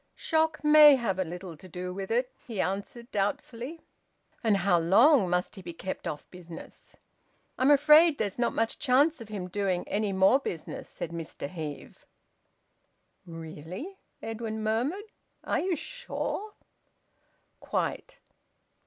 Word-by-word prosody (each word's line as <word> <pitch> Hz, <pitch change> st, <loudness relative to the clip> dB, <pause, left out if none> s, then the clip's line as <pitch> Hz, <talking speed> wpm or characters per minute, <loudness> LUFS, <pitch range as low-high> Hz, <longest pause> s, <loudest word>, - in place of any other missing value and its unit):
"Shock 315 Hz, -2 st, 0 dB
may 300 Hz, -1 st, +9 dB
have 225 Hz, -7 st, -1 dB
had 185 Hz, -, 0 dB
a -, -, -7 dB
little 180 Hz, -1 st, -7 dB
to 185 Hz, -, -14 dB
do 180 Hz, +1 st, -6 dB
with 195 Hz, 0 st, -5 dB
it," 245 Hz, +2 st, 0 dB, 0.2 s
he 225 Hz, -5 st, -5 dB
answered 200 Hz, +6 st, -3 dB
doubtfully. 230 Hz, +9 st, -3 dB, 0.6 s
"And 215 Hz, -3 st, +3 dB
how 180 Hz, -2 st, +3 dB
long 205 Hz, -, +5 dB
must 180 Hz, 0 st, 0 dB
he 190 Hz, -, -9 dB
be 175 Hz, -1 st, -8 dB
kept 185 Hz, +3 st, -6 dB
off 145 Hz, -, -5 dB
business?" 170 Hz, -2 st, -12 dB, 0.6 s
"I'm 260 Hz, +2 st, +4 dB
afraid 300 Hz, +2 st, +6 dB
there's 205 Hz, +1 st, -3 dB
not 235 Hz, -, +2 dB
much 225 Hz, 0 st, -1 dB
chance 285 Hz, +2 st, +3 dB
of 225 Hz, -, -10 dB
him 195 Hz, -4 st, -5 dB
doing 185 Hz, -1 st, -1 dB
any 205 Hz, 0 st, -1 dB
more 190 Hz, +7 st, +4 dB
business," 170 Hz, -, -6 dB
said 165 Hz, -, -6 dB
Mr 165 Hz, -4 st, -6 dB
Heve. 150 Hz, -3 st, -8 dB, 1.2 s
"Really!" 165 Hz, -, -8 dB, 0.2 s
Edwin 220 Hz, -1 st, -4 dB
murmured. 250 Hz, -, -1 dB, 0.4 s
"Are -, -, 0 dB
you 370 Hz, -1 st, 0 dB
sure?" 435 Hz, -, -5 dB, 1.0 s
"Quite." -, -, -3 dB
215 Hz, 140 wpm, -28 LUFS, 180-280 Hz, 1.2 s, may